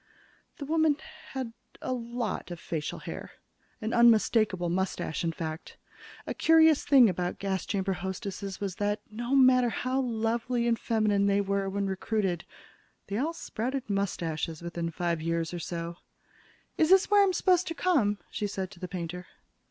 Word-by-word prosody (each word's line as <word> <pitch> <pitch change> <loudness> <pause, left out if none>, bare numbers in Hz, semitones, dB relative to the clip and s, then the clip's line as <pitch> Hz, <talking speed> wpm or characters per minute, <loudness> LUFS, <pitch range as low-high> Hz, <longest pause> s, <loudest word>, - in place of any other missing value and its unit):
The 285 - -6
woman 315 -1 +2 0.4
had 260 -4 -4 0.3
a 255 - -2
lot 235 -4 -3
of 175 -1 -6
facial 155 -3 -4
hair - - -8 0.5
an 220 +2 -2
unmistakable 220 -5 +4
mustache, 180 -1 -2
in 165 - +1
fact. 160 0 -6 0.5
A - - -3
curious 320 -2 +5
thing 265 -5 +7
about 180 -2 -2
gas 190 -2 -2
chamber 195 -2 0
hostesses 190 +1 -5
was 195 -3 -4
that, 205 0 0
no 240 +5 -1
matter 255 -2 +6
how 255 +3 -1
lovely 235 0 0
and 230 -1 +2
feminine 210 -3 +2
they 200 0 +3
were 200 -1 0
when 200 +1 -1
recruited, 190 -2 -1 0.6
they 200 - -1
all 315 +5 0
sprouted 255 -5 -4
mustaches 170 -5 -2
within 170 -1 -3
five 170 0 -2
years 165 +1 -1
or 175 - -3
so. 170 0 -5 0.8
"Is 315 - +4
this 385 +2 +5
where 410 0 +7
I'm 395 -1 +4
supposed 365 -1 +2
to 330 - -3
come?" 280 - +2
she 210 - -2
said 190 -2 -4
to 175 - -14
the 180 - -5
painter. 180 -1 -5
205 Hz, 160 wpm, -29 LUFS, 180-250 Hz, 0.8 s, thing